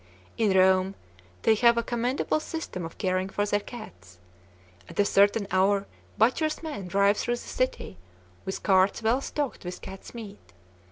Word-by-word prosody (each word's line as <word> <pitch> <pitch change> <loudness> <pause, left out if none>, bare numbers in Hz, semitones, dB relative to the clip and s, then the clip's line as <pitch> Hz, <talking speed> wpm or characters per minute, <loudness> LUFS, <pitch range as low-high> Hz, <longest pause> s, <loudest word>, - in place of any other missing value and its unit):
In 205 -4 +2
Rome, 190 +1 +4 0.5
they 225 - +5
have 235 +2 +4
a 235 - +1
commendable 245 +6 0
system 310 - -5
of 165 - -9
caring 185 -1 0
for 205 +1 -1
their 205 0 +1
cats. 95 - -11 0.7
At - - -9
a 205 - +5
certain 200 +2 +3
hour 195 +1 +3 0.3
butchers' 305 +9 +1
men 290 - -5
drive 200 +3 +3
through 240 - 0
the 240 - -8
city, 255 - -3 0.5
with 190 - -5
carts 190 +3 +3
well 235 +5 +2
stocked 285 -1 -3
with 180 0 -6
cat's 195 +4 -10
meat. 210 - -10
205 Hz, 160 wpm, -27 LUFS, 190-235 Hz, 0.7 s, they